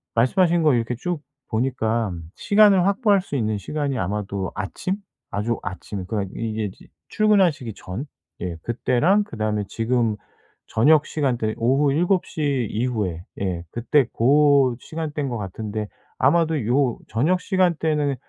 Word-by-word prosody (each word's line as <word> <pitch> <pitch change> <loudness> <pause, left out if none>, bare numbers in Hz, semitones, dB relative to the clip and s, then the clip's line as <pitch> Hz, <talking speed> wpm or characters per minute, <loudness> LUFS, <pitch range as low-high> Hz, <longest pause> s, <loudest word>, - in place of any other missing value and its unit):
말씀하신 170 - +3
거 150 -3 +5
이렇게 120 +1 -1
쭉 170 +5 -3 0.3
보니까 115 -2 0 0.2
시간을 200 -3 +5
확보할 200 -1 +3
수 180 - -6
있는 110 -4 0
시간이 140 +4 -2
아마도 100 0 -3
아침? 105 - -3 0.4
아주 110 +3 -1
아침 95 +1 -6
그러니까 100 -3 -2
이게 110 -3 -2
지 - - -18 0.2
출근하시기 190 - +2
전 95 +10 -6 0.4
예 90 -2 -3
그때랑 130 - +2
그다음에 110 - -2
지금 115 -1 0 0.5
저녁 145 +7 +4
시간대는 120 -7 -1
오후 135 +4 +3
7 175 +4 +2
시 140 - -1
이후에 105 -8 -2 0.2
예 90 -3 -2
그때 130 +4 +2
고 140 0 +4
시간대인 155 -3 -4
것 120 - -3
같은데 105 +1 -4 0.3
아마도 155 -2 +2
요 125 0 +2
저녁 160 +11 +1
시간대는 160 -6 +1
125 Hz, 295 characters per minute, -23 LUFS, 110-155 Hz, 0.5 s, 거